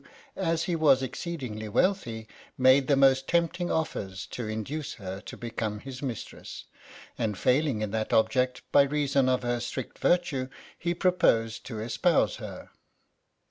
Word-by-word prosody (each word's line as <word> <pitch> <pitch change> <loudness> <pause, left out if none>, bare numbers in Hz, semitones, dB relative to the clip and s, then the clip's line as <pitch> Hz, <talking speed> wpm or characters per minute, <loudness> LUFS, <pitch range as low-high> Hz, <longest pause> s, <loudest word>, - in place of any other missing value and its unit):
as 165 -3 0
lie 175 - 0
was 145 -5 +4
exceedingly 125 -7 -5
wealthy, 115 - 0 0.3
made 130 +1 +5
the 140 - +4
most 135 -1 +4
tempting 175 +1 +1
otters 95 -12 -2
to 120 -3 -6
induce 140 +8 -4
her 95 -1 -7
to - - -9
become 115 -2 -3
his 130 -1 -8
mistress, 125 -6 -6 0.5
and 105 -4 -1
failing 130 - +2
in 105 - -3
that 110 0 -2
object 125 +4 +2
by - - +7
reason 140 -2 +2
of 130 0 +1
her 120 0 0
strict 120 +2 -5
virtue, 150 -8 +1 0.3
he 175 0 -2
proposed 115 - +2
to 115 -4 -5
espouse 115 +2 +1
her. - - -9
130 Hz, 145 wpm, -28 LUFS, 110-155 Hz, 0.5 s, by